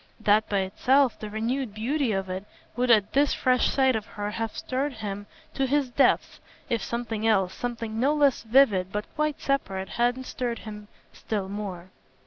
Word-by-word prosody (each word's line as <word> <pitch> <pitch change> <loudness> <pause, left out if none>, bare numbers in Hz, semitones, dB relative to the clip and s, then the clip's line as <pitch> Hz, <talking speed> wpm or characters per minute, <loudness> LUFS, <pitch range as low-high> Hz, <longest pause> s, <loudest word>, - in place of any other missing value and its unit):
That 215 0 +3
by 200 -2 +1
itself, 255 +7 +2
the 215 - -6
renewed 225 +2 -2
beauty 255 +3 0
of 195 -1 -1
it, 185 +2 -5 0.3
would 250 +1 0
at 215 -4 +4
this 285 +1 +3
fresh 255 -1 +2
sight 265 -2 +3
of 220 -1 -3
her 205 0 -4
have 225 0 -4
stirred 270 +2 -2
him 205 -3 -6 0.3
to 270 -1 0
his 275 -1 +1
depths 270 +2 +2 0.3
if 230 - +1
something 225 -2 -2
else, 190 -4 +2
something 230 -2 -4
no 280 +5 +3
less 285 -3 +3
vivid 220 -6 +3
but 210 0 -3
quite 305 -1 -1
separate, 195 -9 -1
hadn't 245 +2 0
stirred 245 -2 -3
him 210 -1 -8 0.3
still 205 -3 -3
more. 190 -3 -6
225 Hz, 175 wpm, -26 LUFS, 205-260 Hz, 0.3 s, at